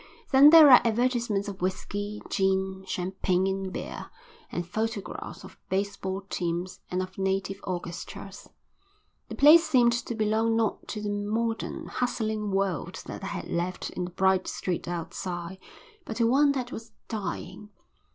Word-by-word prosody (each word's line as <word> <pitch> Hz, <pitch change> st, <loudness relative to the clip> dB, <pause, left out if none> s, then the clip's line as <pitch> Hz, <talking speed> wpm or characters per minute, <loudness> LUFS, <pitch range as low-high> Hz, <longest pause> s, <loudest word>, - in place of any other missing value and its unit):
Then 275 Hz, +2 st, +9 dB
there 310 Hz, -3 st, +9 dB
are 250 Hz, -, +10 dB
advertisements 235 Hz, -3 st, +1 dB
of 195 Hz, -3 st, -7 dB
whisky, 205 Hz, +3 st, -3 dB
gin, 190 Hz, -1 st, 0 dB
champagne, 185 Hz, 0 st, 0 dB
and 190 Hz, 0 st, -2 dB
beer; -, -, -6 dB, 0.4 s
and 175 Hz, -, -3 dB
photographs 220 Hz, +1 st, -4 dB
of -, -, -13 dB
baseball 195 Hz, 0 st, -2 dB
teams 180 Hz, -1 st, -3 dB
and 180 Hz, +1 st, -1 dB
of 185 Hz, +1 st, -10 dB
native 195 Hz, 0 st, -1 dB
orchestras. 180 Hz, +2 st, -6 dB, 0.8 s
The -, -, -5 dB
place 310 Hz, +4 st, +8 dB
seemed 250 Hz, -7 st, +4 dB
to 235 Hz, 0 st, -3 dB
belong 220 Hz, +1 st, +1 dB
not 225 Hz, -2 st, -1 dB
to 210 Hz, -, -5 dB
the 205 Hz, -, -1 dB
modern, 220 Hz, +3 st, -2 dB
hustling 220 Hz, -4 st, -2 dB
world 195 Hz, -5 st, -2 dB
that -, -, -7 dB
I -, -, -3 dB
had -, -, -5 dB
left 175 Hz, +2 st, -2 dB
in 180 Hz, -, -3 dB
the -, -, -6 dB
bright 190 Hz, +1 st, +2 dB
street 180 Hz, -2 st, -3 dB
outside, 175 Hz, +1 st, -5 dB, 0.4 s
but 225 Hz, -, -6 dB
to 235 Hz, -, +2 dB
one 280 Hz, +4 st, +4 dB
that 255 Hz, -2 st, -3 dB
was 225 Hz, 0 st, -8 dB
dying. 210 Hz, -1 st, -5 dB
200 Hz, 150 wpm, -27 LUFS, 185-230 Hz, 0.8 s, are